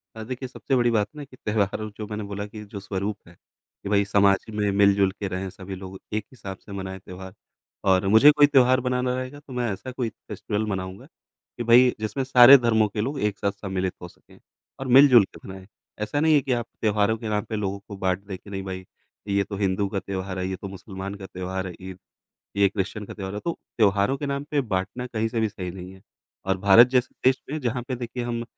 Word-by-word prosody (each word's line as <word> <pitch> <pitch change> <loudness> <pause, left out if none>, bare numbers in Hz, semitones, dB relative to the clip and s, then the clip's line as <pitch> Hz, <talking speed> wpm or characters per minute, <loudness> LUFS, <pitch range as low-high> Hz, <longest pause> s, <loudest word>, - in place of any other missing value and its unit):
हाँ, 110 -1 -7
देखिए 130 +2 -5
सबसे 135 +1 -2
बड़ी 120 -1 +3
बात 105 -3 +2
ना 150 - -7
कि 130 -2 -14
त्यौहार 105 0 -1
जो 110 - -5
मैंने 105 0 -5
बोला 100 0 -4
कि 105 +1 -9
जो 100 0 -8
स्वरूप 100 +1 -3
है, - - -14
ये 100 - -14
भाई 100 -1 +3
समाज 100 -1 +3
में 105 -1 -1
मिल-जुल 100 -1 +4
के 100 - -2
रहे 95 0 -4
हैं 95 - -4
सभी 95 +1 -8
लोग 95 0 -9
एक 110 -1 -1
हिसाब 100 -7 -8
से 100 - -15
मनाए 95 -1 -5
त्यौहार। 95 0 -10 0.6
और 95 0 +3
मुझे 110 +9 +8
कोई 145 -1 +5
त्यौहार 130 -2 +5
बनाना 125 0 0
रहेगा 130 +3 -5
तो 140 -3 -13
मैं 120 -3 -1
ऐसा 130 +7 -7
कोई 125 -2 -2
फेस्टिवल 105 0 -4
मनाऊँगा, 95 -1 -5
कि 120 - -12
भई 120 +2 +6
जिसमें 110 +5 -2
सारे 130 +1 +9
धर्मों 110 -4 +2
के 105 +1 -3
लोग 135 +5 -3
एक 105 -3 -1
साथ 100 - 0
सम्मिलित 95 -2 -3
हो 90 - -7
सकें - - -20 0.4
और 135 - -4
मिल-जुल 130 -3 +8
के - - -13
मनाएँ। 95 0 -10 0.3
ऐसा 105 +7 -1
नहीं 160 +1 +4
है 145 - +4
कि 130 - -4
आप 120 -1 -1 0.2
त्यौहारों 105 0 +2
के 110 -1 -5
नाम 105 -1 0
पे 110 - -2
लोगों 100 -1 -2
को 100 - -7
बाँट 95 -2 0
दें 95 -2 -6
कि 100 - -16
नहीं 95 -1 -5
भई, 95 -1 -6 0.4
ये 100 0 +2
तो 100 +1 -7
हिंदू 100 0 0
का 100 0 -2
त्यौहार 95 -1 -5
है, 90 - -2
ये 95 - -3
तो 100 - -8
मुसलमान 95 0 -7
का 100 -1 -9
त्यौहार 95 0 -4
है 90 - -7
ईद, 95 0 -9 0.6
ये 100 -1 +4
क्रिश्चियन 105 +1 -4
का - - -9
त्यौहार 95 -1 -6
है 105 - -3
तो, 170 - -2 0.2
त्यौहारों 100 +3 +3
के 145 - -4
नाम 140 0 -2
पे 145 -2 +2
बाँटना 105 +3 -3
कहीं 115 -2 -1
से 115 0 -2
भी 110 -1 +1
सही 90 -4 -6
नहीं 90 0 -9
है 95 - -16 0.4
और 95 0 +1
भारत 100 +5 +7
जैसे 125 -1 +1
देश 130 0 +4
में 155 - -2
जहाँ 125 0 -1
पे 130 - -2
देखिए 120 0 -5
हम 115 -1 -3
105 Hz, 235 wpm, -25 LUFS, 95-120 Hz, 0.6 s, सारे